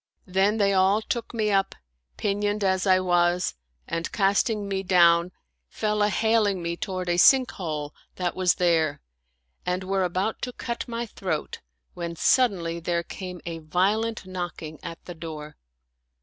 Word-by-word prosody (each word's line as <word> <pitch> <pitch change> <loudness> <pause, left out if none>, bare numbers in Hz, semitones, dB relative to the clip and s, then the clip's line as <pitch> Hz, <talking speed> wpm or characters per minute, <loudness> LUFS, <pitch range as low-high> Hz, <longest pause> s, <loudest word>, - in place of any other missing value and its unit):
Then 195 +3 +2
they 200 -2 +3
all 190 +2 +4
took 235 0 -3
me 215 -3 0
up, 195 -1 +1 0.4
pinioned 205 0 -1
as 190 0 +1
I 185 -1 +5
was, 175 -1 +2 0.3
and 165 0 -3
casting 200 +1 +1
me 195 -1 -1
down, 175 -2 +4 0.4
fell 210 -1 -1
a 205 - +4
haling 220 -2 +2
me 170 0 -2
toward 185 0 -4
a 175 0 +1
sink 255 +7 +6
hole 150 -5 -4 0.2
that 180 -1 -2
was 185 -1 +3
there 160 -4 +2 0.6
and 180 +1 -1
were 190 0 0
about 185 +5 -1
to 250 - -4
cut 235 0 -4
my 235 0 -3
throat, 185 -8 -4 0.3
when 170 -1 -5
suddenly 170 -5 +2
there 170 0 -1
came 180 0 -7
a 165 -1 -4
violent 200 +8 0
knocking 175 -4 -6
at 165 0 -8
the 175 - -7
door. 155 -2 -8
185 Hz, 155 wpm, -25 LUFS, 170-205 Hz, 0.6 s, sink